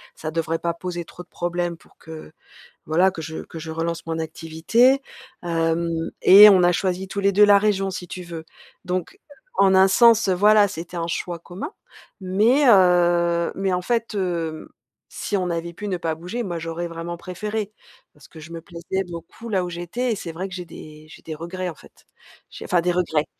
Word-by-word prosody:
ça 155 - -5
devrait 165 0 -2
pas 170 0 -1
poser 175 0 -6
trop 180 - -11
de 175 - -30
problèmes 175 -1 -3
pour - - -25
que 160 -1 -11 0.5
voilà, 180 +4 +3
que 160 - -7
je 160 +1 -6
que 165 - -10
je 160 - -8
relance 165 +1 -3
mon 165 0 -3
activité. 165 - +1 0.4
Hem 165 0 0 0.3
et 205 +3 +10
on 185 -3 +5
a 175 - +5
choisi 185 0 -2
tous 200 - -4
les 200 0 +2
2 210 +2 +6
la 205 -1 +7
région, 195 -2 0
si 180 -1 -6
tu 180 +1 -7
veux. 165 -2 -8 0.4
Donc, 180 - -4 0.4
en 190 -1 +5
un 190 +1 +6
sens, 230 0 +5
heu, 185 - +3
voilà, 210 +2 +5
c'était 175 -1 -8
un 165 0 -2
choix 170 0 -3
commun. 175 - -8 0.5
Mais, 215 +10 +3
heu 175 -3 +4
mais 195 -1 -1
en 180 - 0
fait, 230 0 -1
hem, 170 -4 -3 0.4
si 205 - -3
on 180 -1 -2
avait 170 0 -3
pu 205 +4 -7
ne 185 - -1
pas 165 -2 -2
bouger, 180 +9 -5
moi 175 -4 -4
j'aurais 165 +1 -4
vraiment 170 +1 -6
préféré, 210 +4 -5 0.4
parce 150 -1 -18
que 160 - -13
je 155 +2 -11
me 165 -1 -7
plaisais 175 +3 -4
beaucoup 195 +7 -9
là 190 -3 +1
où - - -5
j'étais 175 +9 -3
et - - 0
c'est 170 -4 -6
vrai 180 +4 -5
que 190 - -11
j'ai 180 -1 -6
des 155 -1 -12
j'ai - - -14
des 160 - -6
regrets 175 +4 -5
en - - -7
fait. - - -20 0.5
J'ai - - -9
enfin 180 - +2
des 180 - +1
regrets, 160 -4 0
175 Hz, 210 wpm, -22 LUFS, 165-195 Hz, 0.5 s, et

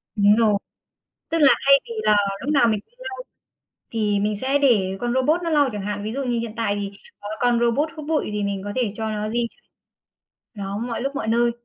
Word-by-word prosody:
Đúng 205 0 +5
rồi, 220 -2 +3 0.8
tức 330 - 0
là 280 - +8
thay 275 0 +7
vì 470 - -10
là 210 -1 +4 0.3
lúc - - -2
nào 240 -5 +5
mình 215 -2 +1
cũng - - -38 0.2
lau, 390 - -7 0.7
thì 210 -3 +1
mình 210 +1 0
sẽ 275 +2 +1
để 200 -9 +2
con 240 0 -1
robot 300 +7 +2
nó 335 - -1
lau 290 -4 +3
chẳng 205 - -4
hạn, 205 0 -3
ví 215 +2 -4
dụ 275 0 -2
như 240 -2 0
hiện 230 -2 -4
tại 225 -3 0
thì 200 0 -4 0.3
có 205 - -8
con 245 -1 +3
robot 240 +6 +1
hút 305 -2 -7
bụi 315 -6 0
thì 210 0 -2
mình 200 -1 -2
có 205 - -4
thể 240 -6 0
cho 220 -1 -2
nó 210 0 -3
di 235 +1 0 1.1
nó 200 -1 -5
mọi 235 +1 -3
lúc 275 +2 -3
mọi 275 - -3
nơi. 235 +1 +3
230 Hz, 230 wpm, -23 LUFS, 210-270 Hz, 1.1 s, là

